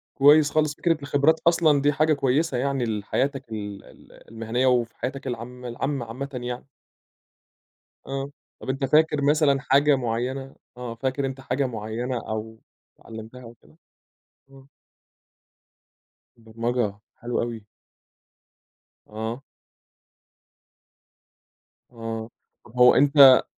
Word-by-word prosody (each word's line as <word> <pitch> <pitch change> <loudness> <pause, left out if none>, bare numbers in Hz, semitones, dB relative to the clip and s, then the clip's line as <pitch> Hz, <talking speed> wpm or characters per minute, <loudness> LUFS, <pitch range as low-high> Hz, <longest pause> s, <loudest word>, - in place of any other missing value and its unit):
كويّس 145 +1 +6
خالص، 155 -1 +1
فكرة 165 0 +1
الخبرات 145 +3 +2
أصلًا 160 -4 +4
دي 145 +1 +2
حاجة 155 +2 +3
كويّسة 140 +1 +1
يعني 135 -1 0
لحياتك 120 +5 -2
ال 105 -2 -6
ال - - -18
المهنيّة، 115 +3 -1
وفي 120 -2 +1
حياتك 135 +1 -5
العامة 125 +1 -6
العامة 125 +2 -3
عامةً 130 +5 -6
يعني. 125 0 -5 1.4
آه، 135 0 -4 0.3
طَب - - -8
أنت 135 +1 -1
فاكر 150 +1 +3
مثلًا 145 -1 +3
حاجة 140 +2 +4
معيّنة 130 +2 -3 0.2
آه، 125 -2 -6
فاكر 130 +3 -2
أنت 135 0 -5
حاجة 135 +1 -1
معيّنة 120 +2 -4
أو 110 +1 -5 0.4
أتعلّمتها 115 +2 -10
أو 115 -1 -11
كده؟ 75 - -22 0.8
آه. 135 0 -16 1.7
البرمجة، 115 -1 -2 0.2
حلو 120 0 -3
أوي. 115 -3 -5 1.4
آه. 110 +4 -5 2.5
آه، 115 -1 -6 0.5
هو 125 0 +7
أنت 140 -2 +7
130 Hz, 110 wpm, -24 LUFS, 115-140 Hz, 2.5 s, هو